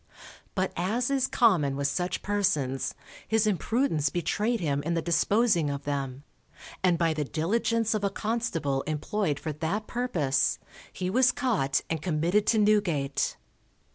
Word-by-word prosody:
But 190 -1 0
as 225 +9 0
is 265 -1 +2
common 170 - +3
with 140 0 0
such 175 +5 -2
persons, 185 -11 0 0.3
his 220 0 +2
imprudence 200 - +1
betrayed 210 +8 -1
him 145 -5 0
in 170 +3 -1
the 165 - 0
disposing 180 -1 +2
of 140 0 -4
them, 140 -2 -3 0.6
and 180 -2 +3
by 165 -1 +2
the 155 -1 -1
diligence 225 - 0
of 215 -2 -2
a 200 - +2
constable 195 -13 -1
employed 155 0 -1
for 155 - -4
that 165 +8 -2
purpose, 175 - 0 0.3
he 180 0 -3
was 255 +3 +4
caught 185 - 0
and 160 -2 -2
committed 175 +5 +1
to 225 - +3
Newgate. 190 -10 +1
175 Hz, 145 wpm, -27 LUFS, 145-215 Hz, 0.6 s, was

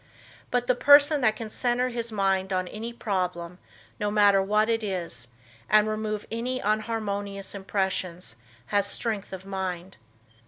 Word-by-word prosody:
But 245 -1 0
the 255 - +3
person 285 +3 +6
that 220 -3 +3
can 220 -2 -7
center 250 +1 +1
his 235 -1 -4
mind 195 -2 0
on 185 -1 0
any 225 +5 -6
problem, 180 -6 -3 0.4
no 210 - 0
matter 205 -2 +5
what 210 +2 +2
it 225 -1 0
is, 170 - -4 0.4
and 215 0 +5
remove 215 -1 -3
any 245 +3 -2
unharmonious 205 -3 -2
impressions 190 - -2 0.3
has 200 +9 +1
strength 215 -4 -2
of 190 0 -8
mind. 190 -1 -4
205 Hz, 145 wpm, -26 LUFS, 190-230 Hz, 0.4 s, person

